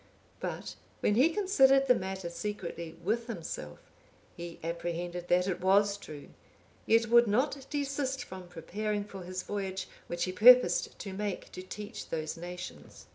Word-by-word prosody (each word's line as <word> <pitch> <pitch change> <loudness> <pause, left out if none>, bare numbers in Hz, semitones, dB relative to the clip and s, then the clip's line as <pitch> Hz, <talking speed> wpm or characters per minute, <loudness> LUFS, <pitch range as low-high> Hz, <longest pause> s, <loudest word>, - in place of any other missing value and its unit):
But - - -5 0.2
when - - +3
he 260 +9 +5
considered 275 -8 +4
the 250 - +7
matter 190 -4 -4
secretly 170 -4 -5
with 230 +5 0
himself, 165 - -6 0.6
he 170 0 -8
apprehended 175 +1 -3
that 180 +1 +3
it 185 - -2
was 200 +2 +4
true, 150 -7 -10 0.6
yet 230 +1 +5
would 235 0 +7
not 270 +5 0
desist 275 -2 -1
from 185 -4 -9
preparing 205 +5 -3
for 200 -2 -9
his 185 +1 -5
voyage 195 -2 -3 0.2
which 175 0 -2
he 185 - -1
purposed 245 +7 +6
to 195 - -6
make 200 -1 -4
to - - -7
teach 210 +4 -7
those 155 -1 -3
nations. 175 +1 -8
195 Hz, 150 wpm, -31 LUFS, 175-235 Hz, 0.6 s, the